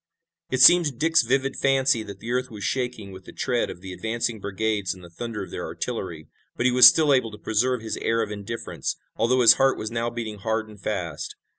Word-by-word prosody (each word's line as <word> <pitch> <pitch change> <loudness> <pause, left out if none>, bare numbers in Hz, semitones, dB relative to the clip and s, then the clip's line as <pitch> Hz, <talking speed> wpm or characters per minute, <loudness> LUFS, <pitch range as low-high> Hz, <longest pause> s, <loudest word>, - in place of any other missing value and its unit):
It 130 - 0
seemed 175 -1 +8
to - - -2
Dick's 160 +6 +2
vivid 135 +3 0
fancy 135 -4 +2
that 100 -3 -9
the 115 - -6
earth 125 +1 -1
was 105 -3 -9
shaking 120 -2 -3
with 95 0 -12
the - - -11
tread 125 -3 -1
of 90 - -9
the 95 -1 -8
advancing 115 +2 -3
brigades 100 -1 -2
and 90 - -15
the 85 - -13
thunder 115 +3 -6
of - - -11
their - - -5
artillery. 90 -10 -5 0.3
But 120 - -2
he 125 - +4
was 125 0 +9
still 155 -3 +5
able 130 -4 +1
to 105 - -11
preserve 115 +4 0
his 110 - -4
air 115 0 0
of 105 - -6
indifference, 105 +3 -5 0.2
although 125 +2 +2
his 115 - +9
heart 135 0 +3
was 110 +1 -5
now 115 0 -2
beating 115 -3 -6
hard 110 +1 -2
and 105 -2 -15
fast. 85 -8 -4
115 Hz, 230 wpm, -24 LUFS, 105-125 Hz, 0.3 s, was